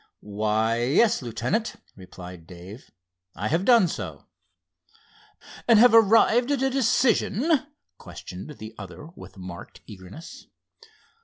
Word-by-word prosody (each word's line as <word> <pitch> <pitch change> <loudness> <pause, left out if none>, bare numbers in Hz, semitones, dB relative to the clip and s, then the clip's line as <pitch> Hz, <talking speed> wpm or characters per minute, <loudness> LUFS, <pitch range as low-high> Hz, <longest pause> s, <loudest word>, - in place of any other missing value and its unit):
"Why, 110 +2 -1
yes, 185 - +2
Lieutenant," 125 - -3 0.2
replied 90 -2 -12
Dave, 90 +7 -12 0.5
"I 105 +6 -3
have 170 +5 0
done 235 -7 +5
so." - - -7 1.4
"And 230 -2 +6
have 245 +2 +6
arrived 225 +3 +4
at 280 -2 0
a 270 - +1
decision?" 255 - +1 0.3
questioned 90 +5 -10
the 110 +1 -10
other 105 - -10
with - - -13
marked 90 -2 -10
eagerness. 100 - -12
130 Hz, 110 wpm, -24 LUFS, -, 1.4 s, And